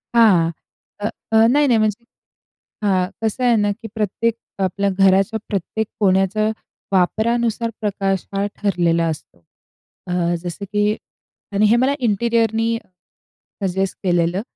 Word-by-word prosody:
हां, 190 -8 +5 0.5
अ, 205 - -1 0.2
अ, 220 - +4 0.2
नाही-नाही 285 -5 +4
म्हणजे 215 +1 0 0.8
हां, 185 -3 +2 0.2
कसं 220 +3 -1
आहे 240 -1 +4
ना 205 -1 +2
की 225 +2 -7
प्रत्येक 220 +2 0 0.3
आपल्या 200 +2 0
घराच्या 195 +3 +3
प्रत्येक 210 +2 -2
कोण्याचा 195 +2 +2 0.4
वापरानुसार 230 +5 +1
प्रकाश 195 -3 -1
हा, 195 +1 0
ठरलेला 170 -4 +1
असतो. 155 - -6 0.7
अ, - - -4 0.3
जसं 175 +3 -5
की 210 +1 +2 0.6
आणि 205 +2 +3
हे 215 +2 +5
मला 260 +3 +3
इंटेरिअरनी 230 +1 +1 0.9
सजेस्ट 190 0 -1
केलेलं, 175 0 +1
205 Hz, 120 wpm, -20 LUFS, 190-225 Hz, 0.9 s, हां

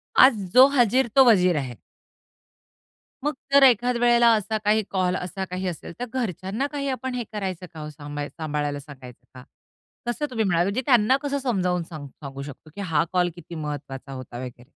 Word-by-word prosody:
आज 250 - +6
जो 260 +1 +9
हाजीर 250 +1 +3
तो 270 -1 +8
वजीर 180 -5 +4
आहे. 130 -4 -4 1.5
मग 295 +1 0 0.2
जर 280 0 +7
एखाद 245 -1 +4
वेळेला 240 0 +5
असा 215 +1 -1
काही 215 +1 +3
कॉल, 185 -2 +1
असा 185 +1 -4
काही 185 +1 -4
असेल, 170 -1 -6
तर 245 - -2
घरच्यांना 220 - -2
काही 285 -1 -3
आपण 260 0 -3
हे 245 - -2
करायचं 190 -4 -4
का 160 - -9
हो, 150 0 -6
सांभा 145 -1 -6
सांभाळायला 150 -2 -3
सांगायचं 135 -4 -13
का? 130 -1 -11 0.6
कसं 240 +5 -1
तुम्ही 225 -4 -1
म्हणालात? 175 -2 +2
म्हणजे 200 +6 -1
त्यांना 245 0 +4
कसं 285 -1 -1
समजावून 185 -9 0
सांगू 155 -4 -9
सांगू 140 -1 -7
शकतो 145 +2 -11
की 200 - -5
हा 165 -5 +1
कॉल 180 -1 +2
किती 170 -1 -10
महत्त्वाचा 145 -3 -6
होता 130 -2 -8
वगैरे? 125 -1 -8
185 Hz, 180 wpm, -24 LUFS, 150-240 Hz, 1.5 s, जो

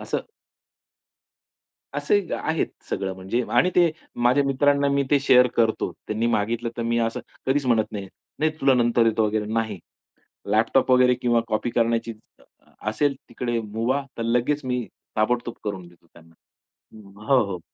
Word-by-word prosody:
असं - - -2 1.8
असे - - +1 0.2
आहेत 160 0 -1 0.2
सगळं 95 -1 -2
म्हणजे 95 +6 -2
आणि 180 - +4
ते 175 -3 +5 0.3
माझ्या 130 +4 +4
मित्रांना 140 +1 +2
मी 140 0 +2
ते 145 - +5
शेअर 125 -2 +5
करतो. 115 -1 +1 0.2
त्यांनी 110 +2 0
मागितलं 115 +1 0
तर 120 - -2
मी 115 0 0
असं 115 0 -1 0.3
कधीच 135 +1 +1
म्हणत 115 -3 +2
नाही, 100 -2 -5 0.3
"नाही 155 +1 +2
तुला 135 -1 +5
नंतर 120 -1 +3
देतो 110 0 +1
वगैरे," 105 0 -1
नाही. 110 -4 -1 0.7
लॅपटॉप 115 +5 +2
वगैरे 125 0 +5
किंवा 120 -1 +1
कॉपी 110 +2 -1
करण्याची 115 0 0 0.3
अ, - - -23 0.5
असेल 140 +6 +1
तिकडे 120 0 -2
मूभा. 115 +6 -1 0.2
तर - - -1
लगेच 125 +5 0
मी 125 -2 -2 0.3
ताबडतोब 120 +2 0
करून 95 -4 -4
देतो 85 -1 -23
त्यांना. 80 0 -19 0.6
अं, 105 -3 -14
हो, 130 -1 +4
हो. 90 - -5
120 Hz, 155 wpm, -24 LUFS, 110-130 Hz, 1.8 s, ते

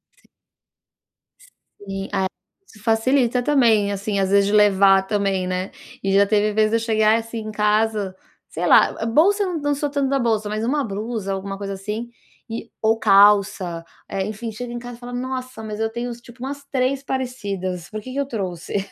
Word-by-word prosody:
Si - - -30 1.5
Sim. 195 -1 -6
É, 190 - +1 0.6
facilita 245 +2 +2
também, 235 -7 +3
assim, 200 0 -2
às 190 - +1
vezes 200 0 +4
de 205 - 0
levar 195 -2 +5
também, 195 -3 0
né. 185 +1 -3 0.3
E 195 0 +1
já 200 +1 +5
teve 210 0 +2
vez 215 0 +3
de 225 - +1
eu - - -1
chegar, 220 -1 +3
assim, 230 0 -6
em 215 0 -6
casa 210 -2 +1 0.3
Sei - - -3
lá, - - +5
ah, 225 - -2
bolsa 370 - +3
eu 355 -4 -2
não 290 0 0
sou 290 +1 -2
tanto 280 -2 0
da 275 - +2
bolsa, 220 -3 0
mas 215 +1 -2
uma 285 +3 +1
blusa, 210 -1 -4
alguma 195 +1 -4
coisa 195 0 -5
assim, 210 +5 -5 0.4
e 225 +1 -5
ou 225 0 +3
calça, 195 -5 +4 0.2
eh, 190 -1 -2
enfim, 215 +2 -5
chega 240 +2 -6
em 240 - -4
casa 245 0 -9
e - - -23
fala: 245 0 -8
"Nossa, 255 -1 -4
mas 215 -1 -6
eu 225 - +1
tenho 240 +1 -4
tipo 235 +1 -16
umas 280 +1 -6
3 265 +1 0
parecidas, 200 -10 -4
por 215 0 -5
que 255 - -10
que 275 - -6
eu 280 - 0
trouxe?" 190 -9 -4
220 Hz, 195 wpm, -22 LUFS, 200-245 Hz, 1.5 s, levar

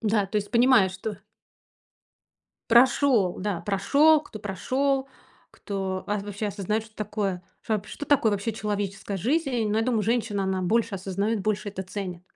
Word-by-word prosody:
Да, 215 -2 +2
то 205 - -3
есть, 205 -1 -2
понимая, 240 -4 +5
что 195 +3 -6 1.5
Прошёл, 240 -5 +4
да, 195 -3 -2
прошёл, 280 - +4
кто 225 - -10
прошёл, 265 +7 -1 0.4
кто 190 -2 -4
ва 210 0 -1
вообще 205 +1 -4
осознаёт, 210 +2 -2
что 220 - -19
такое 205 -3 -2 0.2
что 220 - -1
вап 210 -1 -3
что 290 - -7
такое 240 -7 +3
вообще 205 +3 -1
человеческая 205 -1 -3
жизнь. 250 - 0
Но 215 +1 +1
я 225 - +1
думаю, 235 -4 +1
женщина, 220 -2 0
она 190 -1 -1
больше 225 +3 +1
осознаёт, 195 +3 -1
больше 210 0 -1
это 195 -1 -5
ценит. 185 -2 -6
210 Hz, 160 wpm, -26 LUFS, 195-230 Hz, 1.5 s, понимая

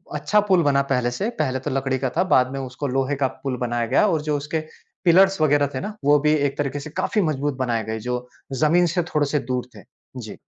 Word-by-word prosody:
अच्छा 210 - +2
पुल 185 -2 +5
बना 140 -1 +3
पहले 120 -1 +1
से, 200 - -2
पहले 130 -3 0
तो 130 - -4
लकड़ी 135 0 -1
का 130 -1 -1
था, 180 - +4
बाद 130 -8 +3
में 135 - -4
उसको 130 +2 -5
लोहे 135 +2 0
का 135 -1 +1 0.2
पुल 130 -2 -2
बनाया 120 -1 -1
गया - - +3
और 160 -5 +1
जो 150 -1 -1
उसके 150 +3 -3 0.5
पिलर्स 190 +2 +5
वगैरह 145 -1 +3
थे - - -1
ना, 210 +8 -6
वो 145 0 +5
भी 150 +1 +2
एक 140 -2 -1
तरीके 145 0 -2
से 150 - -8
काफ़ी 210 - +1
मज़बूत 145 -4 -1
बनाए 120 -3 -1
गए, 110 0 -4
जो 125 +2 -4 0.4
ज़मीन 175 +3 +4
से 175 - +2
थोड़े-से 150 -1 +1
दूर 125 0 -2
थे। - - -12 0.4
जी। 110 - -9
140 Hz, 235 wpm, -22 LUFS, 130-155 Hz, 0.5 s, पुल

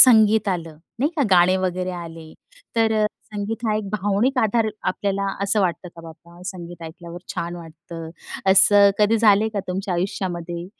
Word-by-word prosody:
संगीत 220 -4 +7
आलं, 165 -4 -3 0.2
नाही 290 +5 +1
का? 290 - +2
गाणी 185 +1 +5
वगैरे 185 0 -2
आली, 165 -2 -9 0.4
तर 225 -1 +3
अ, - - +3 0.3
संगीत 220 +3 -4
हा 215 -1 +1
एक 210 -2 -4
भावनिक 210 +6 0
आधार. 220 +1 +1
आपल्याला 200 +1 -1 0.2
असं 200 +1 +1
वाटतं 175 -1 -1
का - - -9
बाबा, 170 +2 -14
संगीत 175 -2 -8
ऐकल्यावर 170 +2 -9
छान 175 +1 -4
वाटतं? 165 0 -10 0.4
असं 200 +1 +7
कधी 215 +2 +3
झालंय 215 0 +4
का 200 - 0
तुमच्या 185 0 -2
आयुष्यामध्ये, 175 -1 -3
185 Hz, 160 wpm, -22 LUFS, 170-210 Hz, 0.4 s, संगीत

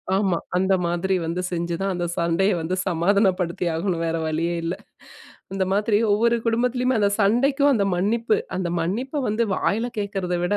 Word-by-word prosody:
ஆமா, 190 -4 +1 0.2
அந்த 190 +1 +2
மாதிரி 175 +3 0
வந்து 170 +2 -2
செஞ்சுதான் 175 +3 -2
அந்த 175 0 -2
சண்டைய 170 +4 +2
வந்து 175 +3 -2
சமாதானப்படுத்தி 180 0 +1
ஆகணும். 170 0 -1
வேற 165 0 -1
வழியே 165 +2 -1
இல்ல. 170 +3 -2 0.8
இந்த 190 -1 +1
மாதிரி 205 +1 +2
ஒவ்வொரு 235 +3 +3
குடும்பத்திலயுமே 250 +2 +1
அந்த 200 -1 +3
சண்டைக்கும் 275 +7 +3
அந்த 200 -3 +1
மன்னிப்பு, 220 +5 +1 0.2
அந்த 175 -2 -2
மன்னிப்ப 250 - -2
வந்து 215 +3 +1
வாயில 225 +7 0
கேட்கிறத 195 -3 -2
விட, 205 +4 +1
195 Hz, 155 wpm, -23 LUFS, 175-225 Hz, 0.8 s, ஒவ்வொரு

